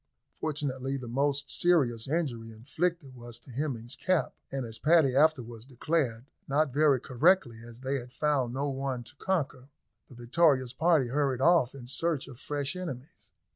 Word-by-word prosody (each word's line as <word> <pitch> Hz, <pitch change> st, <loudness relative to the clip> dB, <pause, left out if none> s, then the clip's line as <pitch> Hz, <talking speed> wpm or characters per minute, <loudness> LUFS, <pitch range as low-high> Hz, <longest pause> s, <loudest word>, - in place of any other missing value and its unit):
Fortunately, 140 Hz, -3 st, -3 dB
the 125 Hz, -2 st, -7 dB
most 140 Hz, +3 st, 0 dB
serious 135 Hz, -10 st, +2 dB
injury 130 Hz, -8 st, -2 dB
inflicted 145 Hz, +5 st, -3 dB
was 120 Hz, -1 st, -9 dB
to 120 Hz, +2 st, -15 dB
Hemming's 125 Hz, -3 st, -4 dB
cap, 185 Hz, -3 st, 0 dB, 0.2 s
and, 135 Hz, -2 st, -3 dB
as 115 Hz, -1 st, -6 dB
Paddy 155 Hz, -5 st, +4 dB
afterwards 125 Hz, -7 st, +2 dB
declared 130 Hz, -2 st, -1 dB, 0.2 s
(not 140 Hz, -1 st, +1 dB
very 145 Hz, -2 st, +4 dB
correctly, 130 Hz, -2 st, +2 dB
as 120 Hz, +1 st, -12 dB
they 135 Hz, +1 st, -1 dB
had 125 Hz, 0 st, -11 dB
found 140 Hz, -4 st, 0 dB
no 135 Hz, +3 st, -2 dB
one 135 Hz, -2 st, -3 dB
to 135 Hz, -, -15 dB
conquer), 140 Hz, -8 st, -2 dB, 0.4 s
the 125 Hz, -, -13 dB
victorious 130 Hz, +1 st, +2 dB
party 160 Hz, -3 st, +2 dB
hurried 135 Hz, -1 st, 0 dB
off 145 Hz, -4 st, +3 dB
in 130 Hz, -3 st, -9 dB
search 140 Hz, +3 st, -2 dB
of 125 Hz, -3 st, -12 dB
fresh 145 Hz, 0 st, -2 dB
enemies. 155 Hz, -7 st, -8 dB
135 Hz, 160 wpm, -29 LUFS, 120-150 Hz, 0.4 s, Paddy